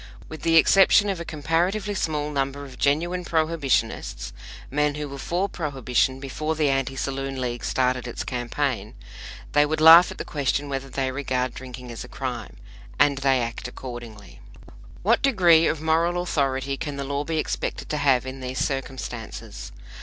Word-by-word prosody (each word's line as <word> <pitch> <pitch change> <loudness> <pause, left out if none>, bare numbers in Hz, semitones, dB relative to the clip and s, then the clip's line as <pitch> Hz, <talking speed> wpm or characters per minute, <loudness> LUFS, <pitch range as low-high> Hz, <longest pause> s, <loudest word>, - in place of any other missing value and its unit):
With 160 - -8
the 165 -1 +2
exception 195 +4 +6
of 190 -3 -2
a - - -4
comparatively 170 +7 0
small 150 -5 -2
number 140 0 -2
of 130 -2 -12
genuine 175 +6 +1
Prohibitionists 155 - -1 0.4
men 150 +1 +1
who 150 0 -4
were 140 0 -8
for 180 +7 -1
Prohibition 135 - -1
before 155 +4 -3
the 150 -2 +2
Anti 135 0 -1
Saloon 135 0 -3
League 120 -3 -3
started 125 +7 0
its 120 - -4
campaign 120 -2 -2 0.6
they 145 - +5
would 155 +1 -1
laugh 165 +3 +9
at - - -8
the - - -5
question 145 0 -1
whether 135 0 -4
they 130 0 -1
regard 130 -2 -2
drinking 125 -1 -9
as 115 - -6
a - - -10
crime. - - -5 0.4
And 140 -2 +3
they 135 -2 +3
act 115 +1 -4
accordingly. 120 -5 -9 0.6
What 225 +5 +3
degree 175 -11 +5
of 155 - -1
moral 165 +2 +2
authority 135 -4 -1
can 145 -1 -4
the 140 - -4
law 140 +1 -2
be 160 +1 -2
expected 155 - -3
to 150 - -1
have 135 -4 +3
in 130 +1 -6
these 130 0 -5
circumstances? 125 - -4
140 Hz, 170 wpm, -24 LUFS, 130-160 Hz, 0.6 s, laugh